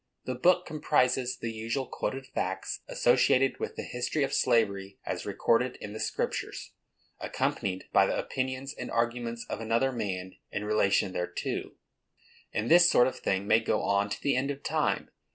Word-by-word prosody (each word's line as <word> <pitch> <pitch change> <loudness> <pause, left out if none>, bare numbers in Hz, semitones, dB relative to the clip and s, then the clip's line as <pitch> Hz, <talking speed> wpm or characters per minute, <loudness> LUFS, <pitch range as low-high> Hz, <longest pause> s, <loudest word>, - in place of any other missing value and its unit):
The 130 - -2
book 175 +8 +3
comprises 130 -4 +1
the 115 - -4
usually 115 +4 -3
quoted 135 0 -3
facts 95 -7 -3
associated 135 +1 +3
with - - -4
the - - -5
history 125 +4 -1
of 135 - -1
slavery 100 -4 +1
as - - -4
recorded 125 +2 +1
in 105 - -8
the 110 - -6
Scriptures, - - -3 0.5
accompanied 95 -1 -2
by - - +6
the - - -1
opinions 130 +1 -3
and - - -6
arguments 115 0 -1
of 110 - -4
another 115 +4 +1
man 95 -6 -4
in 105 - -3
relation 100 -3 +2
thereto. 90 - -3 0.8
And 110 +2 -1
this 175 +1 +8
sort 125 - +6
of 130 - -2
thing 95 +1 0
may 110 - +5
go 110 - 0
on 100 +1 +1
to - - -4
the 140 - +1
end 130 +2 0
of 140 0 -5
time. - - 0
115 Hz, 170 wpm, -29 LUFS, 105-130 Hz, 0.8 s, this